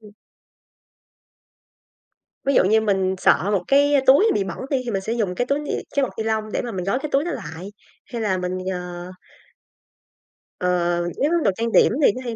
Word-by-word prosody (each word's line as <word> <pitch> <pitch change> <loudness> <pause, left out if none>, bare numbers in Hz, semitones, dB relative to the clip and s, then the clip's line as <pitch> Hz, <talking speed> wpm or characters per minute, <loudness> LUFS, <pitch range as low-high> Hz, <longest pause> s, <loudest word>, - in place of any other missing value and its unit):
ừm 210 -1 -15 2.4
Ví 275 - +2
dụ - - +5
như 220 +4 +3
mình 190 -3 0
sợ 185 +1 +3
một 195 -3 0
cái 285 +1 +4
túi 280 +12 +6
bị 205 - 0
bẩn 190 - -6
đi, 270 -3 0
thì 235 - -3
mình 195 - -1
sẽ 220 +4 -3
dùng 200 -6 -1
cái 245 - 0
túi 280 +2 +1
ni 295 - -5 0.2
cái 280 - +3
bọc 265 - -2
ni 220 - -2
lông 220 -1 -2
để - - -1
mà 240 - -5
mình 185 -2 -4
gói 225 +7 0
cái 300 - -5
túi 275 +2 +2
đó 350 - -2
lại, 175 +6 -7 0.4
hay 235 - -3
là 200 -4 0
mình, 180 0 -3 0.2
ờ 180 0 -7 1.5
Ờ, 180 - -1 0.5
nếu 290 +3 +2
đồ 200 - +3
trang 230 0 -1
điểm - - +5
thì 275 - +6
nó 255 - -6
hay 235 -2 -4
220 Hz, 210 wpm, -22 LUFS, 190-260 Hz, 2.4 s, túi